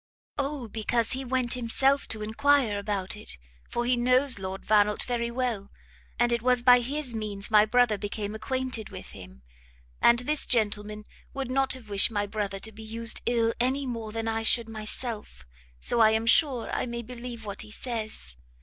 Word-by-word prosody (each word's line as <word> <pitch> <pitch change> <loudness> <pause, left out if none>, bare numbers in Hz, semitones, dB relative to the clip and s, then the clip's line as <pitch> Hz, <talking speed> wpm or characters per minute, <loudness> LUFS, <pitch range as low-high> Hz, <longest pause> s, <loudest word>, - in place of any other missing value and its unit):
"O 280 -3 -3
because 225 +1 -1
he 265 +1 -1
went 255 -1 0
himself 265 +3 +1
to 215 -1 -4
enquire 230 -1 +2
about 200 -2 -3
it; 210 - -4 0.3
for 240 - -2
he 250 +1 +3
knows 250 0 +3
Lord 190 0 -6
Vannelt 210 0 +3
very 235 -1 -2
well, 235 -5 -3 0.5
and 240 0 +2
it 235 -1 +1
was 250 0 +2
by 250 0 +7
his 265 +1 -2
means 210 -2 -4
my 210 -1 +6
brother 240 -2 +2
came 205 0 -4
acquainted 255 0 -2
with - - -10
him. 65 +1 -13 0.6
And 235 - +6
this 295 +5 +3
gentleman 210 -2 0 0.3
would 270 -2 -3
not 270 0 +2
have 255 -4 -8
wished 200 -1 +5
my 205 -2 -1
brother 205 -1 -4
to 220 - -3
be 220 +1 -12
used 230 +1 +1
ill 230 -1 +2
any 265 +3 0
more 230 -4 -5
than 225 +1 -4
I 225 0 -1
should 230 +1 +3
myself, 215 - -5 0.3
so 235 - 0
I 220 -1 +7
am 220 +1 0
sure 255 0 +3
I - - -1
may 235 0 -5
believe 240 -1 -8
what 200 -1 -5
he 215 - -7
says. 220 - -5
230 Hz, 185 wpm, -27 LUFS, 215-250 Hz, 0.6 s, by